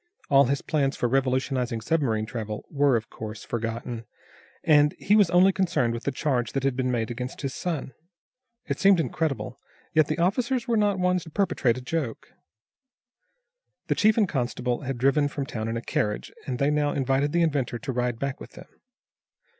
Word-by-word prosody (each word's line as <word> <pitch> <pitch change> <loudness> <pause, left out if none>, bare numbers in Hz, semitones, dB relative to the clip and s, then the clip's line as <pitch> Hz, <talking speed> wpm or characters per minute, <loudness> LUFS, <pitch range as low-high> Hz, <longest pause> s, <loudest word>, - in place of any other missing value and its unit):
All 140 0 +7
his 140 +2 -1
plans 140 -3 0
for 120 - +1
revolutionizing 130 -2 0
submarine 115 -5 0
travel, 110 -2 -5
were, 140 -3 +3
of 115 0 -3
course, 105 -1 -7
forgotten, 115 0 -4 0.6
and 150 -1 +4
he 205 - +2
was 205 -5 +5
only 185 +2 +5
concerned 175 -11 +1
with 115 - -6
the 140 - +1
charge 130 -4 -1
that 135 - -1
had 135 -2 +1
been 130 0 0
made 120 -1 -1
against 125 +2 -5
his 135 -2 -3
son. 160 -7 -3 0.7
It - - -3
seemed 195 -2 +5
incredible, 140 -3 -2 0.3
yet 155 -2 +4
the 155 - -2
officers 235 +9 0
were 235 - +2
not 205 -2 +2
ones 180 0 +1
to - - -9
perpetrate 155 - +1
a - - -6
joke. 130 -2 -3 1.6
The - - +4
chief 215 +1 +3
and 215 -3 +4
constable 125 -3 -2
had 135 -2 -4
driven 140 +4 +3
from 140 -1 -4
town 110 -4 -4
in 115 +1 -2
a 115 - -5
carriage, 105 -2 -2
and 125 - -2
they 140 +3 +2
now 150 -1 +1
invited 135 +2 +1
the 170 +1 +2
inventor 140 -7 0
to 120 - -5
ride 125 -1 -1
back 140 +2 -3
with - - -11
them. 175 - -13
135 Hz, 185 wpm, -26 LUFS, 120-160 Hz, 1.6 s, All